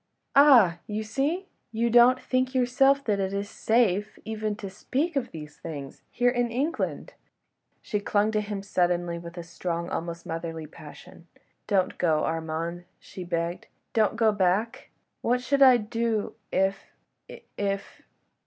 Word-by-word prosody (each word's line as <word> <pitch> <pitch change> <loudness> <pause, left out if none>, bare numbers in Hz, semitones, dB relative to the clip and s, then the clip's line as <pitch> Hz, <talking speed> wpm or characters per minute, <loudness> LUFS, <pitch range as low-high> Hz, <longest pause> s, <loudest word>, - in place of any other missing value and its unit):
"Ah! 245 - +7
you 215 +1 -3
see: 285 - -1 0.3
you 230 +1 0
don't 245 +2 +6
think 255 0 -1
yourself 270 +2 +3
that 205 -5 0
it 190 0 -1
is 200 +1 -2
safe 215 -2 +1
even 215 -1 -3
to 205 - -7
speak 265 - -2
of 275 - -1
these 150 -2 -10
things—here 160 - -3
in 245 -1 0
England!" 275 +8 -2 0.7
She 210 - -2
clung 205 +1 +1
to 215 -1 +1
him 205 -1 -5
suddenly 175 -3 0
with 170 +1 -10
strong, 170 0 -4
almost 170 0 -4
motherly, 165 -1 -5
passion: 155 +2 -13 0.4
"Don't 195 -3 +1
go, 160 -3 +2
Armand!" 165 +2 -3
she 185 - -9
begged; 170 0 -3 0.3
"don't 220 -1 +2
go 225 -1 +3
back! 200 +3 0 0.3
What 245 +1 +1
should 275 +3 0
I 260 -2 +8
do 225 -1 -2 0.2
if... 190 +1 +1 0.5
if... - - -11
if 200 -1 -3
205 Hz, 145 wpm, -26 LUFS, 175-240 Hz, 0.7 s, I